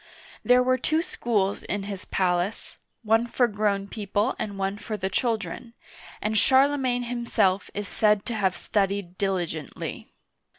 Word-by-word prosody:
There 250 0 +5
were 255 0 +2
two 315 +6 +1
schools 205 - -1
in 205 -1 -3
his 195 -1 -6
palace, 180 +2 -1 0.2
one 225 +2 +3
for 245 +1 +2
grown 205 -2 0
people 205 +3 -1
and 200 -2 -4
one 195 +1 -2
for 215 -1 -4
the 190 -1 -3
children, 225 +1 -2 0.5
and 215 +1 0
Charle 270 +6 +5
magne 250 -3 0
himself 235 -5 0
is 205 0 -3
said 210 -1 +2
to 240 - -3
have 195 -4 +1
studied 195 -3 -1
diligently. 175 -6 -3
205 Hz, 145 wpm, -26 LUFS, 195-235 Hz, 0.5 s, There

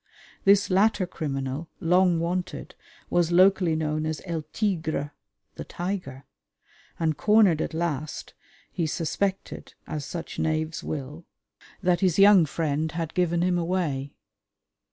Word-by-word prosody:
This 200 0 +4
latter 200 +1 +3
criminal, 140 -2 -4
long 180 0 +3
"wanted," 175 +2 -3 0.4
was 175 -1 +2
locally 185 -2 +4
known 155 0 -1
as 155 -1 -3
El 170 -3 -3
Tigre 160 -8 -1 0.5
(The - - -5
Tiger), 175 -8 -5 0.8
and, 160 -2 +1
cornered 200 -1 +4
at - - -3
last, 155 -3 -3 0.4
he 165 - -1
suspected, 190 +5 -3
as 155 -2 -5
such 165 +3 -6
knaves 155 0 -1
will, 150 +3 -6 0.6
that 180 -1 +2
his 185 -4 +2
young 195 -4 +7
friend 155 +1 -1
had 165 -2 -4
given 175 -1 +1
him 180 -1 +1
away. 165 -6 -2
165 Hz, 125 wpm, -26 LUFS, 155-185 Hz, 0.8 s, young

